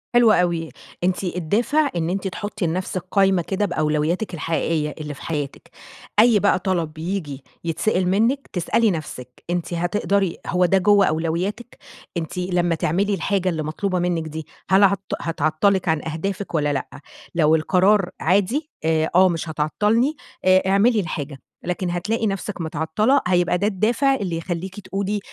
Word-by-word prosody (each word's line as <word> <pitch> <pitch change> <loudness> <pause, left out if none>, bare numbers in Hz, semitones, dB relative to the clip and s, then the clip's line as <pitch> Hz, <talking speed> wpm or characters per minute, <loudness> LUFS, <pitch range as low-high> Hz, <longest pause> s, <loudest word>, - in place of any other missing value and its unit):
حلو 240 -2 +6
أوي، 170 -4 +1 0.3
أنتِ 185 +2 0
الدافع 205 - +1
إن 165 -1 -1
أنتِ 195 +2 -2
تحطي 205 -1 -3
لنفسِك 185 +2 -3
قايمة 195 -2 +3
كده 195 +4 -1
بأولوياتِك 160 +3 -1
الحقيقية 160 -1 -1
اللي 150 -1 -5
في - - -13
حياتِك. 145 -4 -5 0.5
أي 225 -1 +6
بقى 200 -1 +3
طلب 170 -4 -2
ييجي 155 -5 -4 0.2
يتسأِل 180 +3 0
منِّك، 230 +8 +1
تسألي 205 +5 +2
نفسِك 130 -7 -7
أنتِ 175 0 -2
هتقدري، 185 +1 0
هو 180 0 +2
ده 195 +2 +3
جوّه 200 +1 +5
أولوياتِك، 170 +9 -2 0.4
أنتِ 165 +2 -4
لمَّا 180 -2 0
تعملي 190 +6 0
الحاجة 190 0 0
اللي 160 -2 -2
مطلوبة 180 +4 -2
منِّك 175 -2 -1
دي 155 0 -7 0.2
هل 190 +2 +5
هت 195 -1 +4 0.2
هتعطَّلِك 165 +4 +1
عن 160 -1 +1
أهدافِك 185 +5 -4
والّا 145 -1 +1
لأ؟ 135 - -2 0.5
لو 160 -1 +4
القرار 185 +4 +3
عادي، 205 - +1
آآ، 160 0 +1
آه 185 +1 +6
مش 165 -1 -3
هتعطَّلني 210 - +1 0.3
آآ 185 0 +5
اعملي 210 +4 +4
الحاجة، 145 -6 -4 0.2
لكن 180 0 -2
هتلاقي 210 +6 -1
نفسِك 195 -2 -4
متعطَّلة 165 - +1
هيبقى 180 0 +2
ده 200 +3 +1
الدافع 235 +7 +2
اللي 180 -9 -3
يخليكِ 180 +3 -5
تقولي 200 +1 -2
180 Hz, 150 wpm, -22 LUFS, 160-200 Hz, 0.5 s, حلو